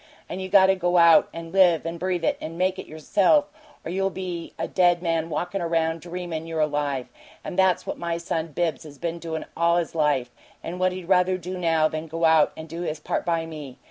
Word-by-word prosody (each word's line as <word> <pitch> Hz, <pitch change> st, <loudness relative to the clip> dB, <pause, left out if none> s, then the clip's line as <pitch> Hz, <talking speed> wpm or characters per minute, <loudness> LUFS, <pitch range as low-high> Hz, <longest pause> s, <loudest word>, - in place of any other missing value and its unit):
and 190 Hz, -, -5 dB
you 190 Hz, -, -5 dB
got 190 Hz, -1 st, +7 dB
to 190 Hz, -, +4 dB
go 180 Hz, -1 st, +1 dB
out 170 Hz, +3 st, +6 dB
and 165 Hz, 0 st, -8 dB
live 180 Hz, -4 st, +4 dB
it -, -, -2 dB
and 165 Hz, 0 st, -5 dB
breathe 180 Hz, -1 st, -1 dB
it -, -, +2 dB
and 165 Hz, +1 st, -6 dB
MAKE 185 Hz, +1 st, 0 dB
it -, -, -8 dB
yourself, 195 Hz, -, +2 dB, 0.3 s
or -, -, -4 dB
you'll 195 Hz, +1 st, 0 dB
only 195 Hz, -, -6 dB
be 180 Hz, -3 st, -5 dB
a -, -, -2 dB
dead 175 Hz, -2 st, +3 dB
man 165 Hz, -1 st, 0 dB
walkin' 180 Hz, +4 st, -2 dB
around 165 Hz, -1 st, 0 dB
dreamin' 170 Hz, -2 st, -5 dB
you're 165 Hz, -1 st, -3 dB
alive. 145 Hz, -4 st, -1 dB, 0.4 s
And -, -, -6 dB
that's 185 Hz, -1 st, +3 dB
what -, -, -5 dB
my 170 Hz, -1 st, -2 dB
son 165 Hz, -1 st, -3 dB
Bibbs 160 Hz, -1 st, -2 dB
has 145 Hz, -2 st, -12 dB
been 170 Hz, +4 st, -4 dB
doin' 165 Hz, -1 st, -5 dB
all 170 Hz, +1 st, +3 dB
his 170 Hz, -2 st, -2 dB
life, 145 Hz, -6 st, +1 dB, 0.3 s
and 180 Hz, +2 st, -5 dB
what 185 Hz, 0 st, +2 dB
he'd 180 Hz, -2 st, -7 dB
rather 185 Hz, 0 st, +3 dB
do 185 Hz, +1 st, -6 dB
now 165 Hz, -3 st, +2 dB
than 155 Hz, +1 st, -5 dB
go 165 Hz, +1 st, -1 dB
out 160 Hz, -2 st, +5 dB
and 160 Hz, 0 st, -8 dB
do 165 Hz, +2 st, -6 dB
his 155 Hz, -3 st, -3 dB
part 150 Hz, -, -3 dB
by 165 Hz, -1 st, +1 dB
me. 150 Hz, -5 st, -9 dB
170 Hz, 235 wpm, -24 LUFS, 160-180 Hz, 0.4 s, got